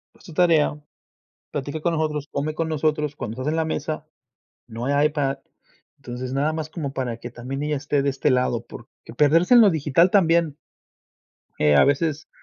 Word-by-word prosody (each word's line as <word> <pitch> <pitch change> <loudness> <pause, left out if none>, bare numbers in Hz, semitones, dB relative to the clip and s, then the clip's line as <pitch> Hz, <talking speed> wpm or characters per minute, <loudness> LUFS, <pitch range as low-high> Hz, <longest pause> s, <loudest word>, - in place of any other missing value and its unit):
haz - - -22
tu 170 - -12
tarea, 155 -3 +2 0.7
platica 145 +2 -4
con 170 0 0
nosotros, 150 -2 -2
come 150 +2 -2
con 165 0 -2
nosotros, 150 -1 -1
cuando 110 -6 -6
estás 130 +4 -3
en 160 - -1
la 160 - +1
mesa, 155 0 -4 0.6
no 115 +1 -6
hay 145 +2 +3
iPad". 145 -3 -2 0.6
Entonces, 125 -1 -6
nada 145 +3 +1
más 155 -1 -4
como 150 -4 -5
para 120 -3 -3
que 120 - -8
también 130 +4 -5
ella 150 0 -1
esté 145 +1 0
de 140 - +1
este 135 +1 0
lado, 125 -2 0
porque 120 -1 -13
perderse 165 - +4
en 240 - +9
lo 210 - +7
digital 160 +1 +3
también 170 -6 +3 1.0
eh, 75 -1 +4
a - - +7
veces 150 +2 0
150 Hz, 185 wpm, -23 LUFS, 135-160 Hz, 1.0 s, en